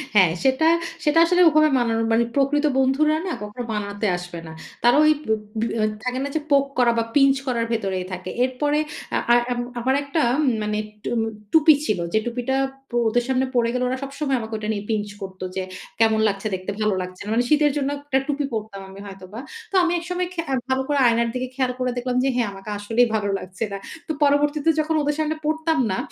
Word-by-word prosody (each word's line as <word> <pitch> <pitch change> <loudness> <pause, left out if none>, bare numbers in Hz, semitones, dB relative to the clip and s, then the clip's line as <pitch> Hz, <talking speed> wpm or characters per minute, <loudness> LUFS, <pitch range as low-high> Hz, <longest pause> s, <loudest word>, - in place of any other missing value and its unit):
হ্যাঁ, 185 -5 +6
সেটা 265 +4 +3 0.4
সেটা 305 0 +3
আসলে 360 +1 +3
ওভাবে 310 0 +4
মানানোর 225 -1 +1
মানে 235 - +4
প্রকৃত 285 +2 +2
বন্ধুরা 270 +4 +3
না - - -2
কখনো 210 +4 -6
মানাতে 205 0 -3
আসবে 175 -1 -8
না। - - -8 0.3
তারা 240 +4 +5
ওই 305 - +6
বোপ 220 -1 0 0.2
বোয়্যা 225 -1 0 0.2
থাকে 250 0 -2
না - - -2
যে - - +2
পোক 280 -1 +5
করা 245 -2 +4
বা 230 - +2
পিঞ্চ 275 -1 +5
করার 235 -2 0
ভেতরেই 195 -5 -1
থাকে। 185 0 -5
এরপরে 290 +4 0 0.4
আ - - +3 0.2
আ - - +7 0.2
আম 245 - -1 0.2
আমার 260 +3 +1
একটা 280 +3 -2 0.2
উম - - +2 0.2
মানে 210 0 -1 0.3
টু - - -3 0.4
টুপি 315 0 +7
ছিল। 210 - 0
যে 220 - +4
টুপিটা 245 +2 -2 0.3
প - - -28 0.2
ওদের 245 +2 +1
সামনে 265 0 +1
পরে 235 -1 +3
গেল 250 - -1
ওরা 255 +1 -1
সবসময় 275 0 -2
আমাকে 220 -1 -7
ওটা 215 0 -5
নিয়ে 205 -1 -4
পিঞ্চ 210 -2 0
করত 190 -1 -8
যে, 190 - -1 0.4
"কেমন 220 -1 +4
লাগছে 200 +1 -2
দেখতে, 185 +1 -4
ভালো 215 -1 +2
লাগছে 185 0 -8
না।" 205 - -7
মানে 240 +2 +2
শীতের 300 -1 +4
জন্য 280 -1 0
একটা 280 -2 +1
টুপি 290 -1 -1
পরতাম 215 -3 -5
আমি 195 +1 -11
হয়তোবা। 195 +2 -9 0.3
তো - - -4
আমি 345 - +2
একসময় 360 +1 -3
খে 340 - -2
অ্যা 270 - 0
ভালো 260 0 +1
করে 290 -1 +1
আয়নার 235 0 +2
দিকে 255 0 -2
খেয়াল 260 -1 +1
করে 255 0 0
দেখলাম 245 0 -2
যে, 270 - +2
হ্যাঁ, 240 -3 +1
আমাকে 195 +2 -10
আসলেই 225 +4 +2
ভালো 210 -2 0
লাগছে 185 +4 -6
না। 200 - -3 0.3
তো - - -2
পরবর্তীতে 290 +2 +2
যখন 310 +1 0
ওদের 295 0 0
সামনে 310 0 0
পরতাম 315 0 +1
না, 190 - -1
250 Hz, 215 wpm, -23 LUFS, 215-290 Hz, 0.4 s, আ